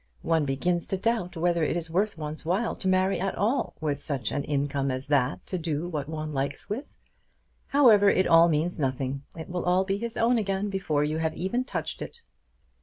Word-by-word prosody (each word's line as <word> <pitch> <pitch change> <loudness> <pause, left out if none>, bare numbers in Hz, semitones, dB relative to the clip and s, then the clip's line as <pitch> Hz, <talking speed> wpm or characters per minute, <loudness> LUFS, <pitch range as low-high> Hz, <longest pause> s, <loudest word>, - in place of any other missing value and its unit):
One 165 -2 +2
begins 170 +6 0
to 195 - -1
doubt 190 -4 -1
whether 170 0 +1
it 160 - 0
is 165 -1 -4
worth 200 +3 0
one's 155 0 -6
while 190 +8 0
to 190 - -4
marry 185 0 +2
at 195 +1 -1
all 235 +7 0
with 145 -2 -2
such 140 -5 -3
an 145 - -1
income 140 -1 0
as 130 +1 -3
that 125 -11 +1
to 185 - -3
do 160 0 -2
what 150 -4 -4
one 155 -1 -4
likes 140 0 -3
with! 220 +8 -5 0.8
However, 225 -8 +6
it 185 -1 +3
all 165 +1 +6
means 165 +3 0
nothing. 135 0 -1 0.2
It 160 - -6
will 180 0 -3
all 180 +1 +3
be 195 +1 -1
his 235 +1 -5
own 235 +1 +3
again 200 0 -1
before 160 -7 0
you 155 +2 -1
have 160 -1 -1
even 215 +8 -1
touched - - -4
it." 470 0 -8
170 Hz, 205 wpm, -27 LUFS, 150-195 Hz, 0.8 s, However